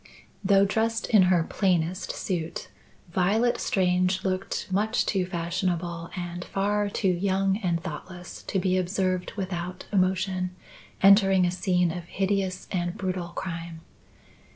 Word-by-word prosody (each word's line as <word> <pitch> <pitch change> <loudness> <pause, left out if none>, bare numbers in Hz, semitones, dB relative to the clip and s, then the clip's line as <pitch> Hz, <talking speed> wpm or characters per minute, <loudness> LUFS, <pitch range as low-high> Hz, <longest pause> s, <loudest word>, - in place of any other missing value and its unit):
Though 195 0 +5
dressed 225 +2 0
in 215 -4 +7
her 175 -3 +4
plainest 180 -1 0
suit, 170 -4 -3 0.4
Violet 220 +7 +2
Strange 185 0 +1
looked 185 0 -2
much 215 +5 +1
too 190 -3 0
fashionable 170 -1 -2
and 175 0 -4
far 205 +2 0
too 200 - -1
young 190 +2 +1
and 175 -6 0
thoughtless 180 +1 -8
to - - -1
be 185 0 +2
observed, 185 0 -1
without 180 -2 -4
emotion, 185 -1 +1 0.5
entering 195 -2 +6
a 175 - +1
scene 180 -2 +1
of 175 0 -6
hideous 190 0 -1
and 175 -1 -2
brutal 185 -2 -2
crime. 170 -2 -6
185 Hz, 130 wpm, -26 LUFS, 175-195 Hz, 0.5 s, in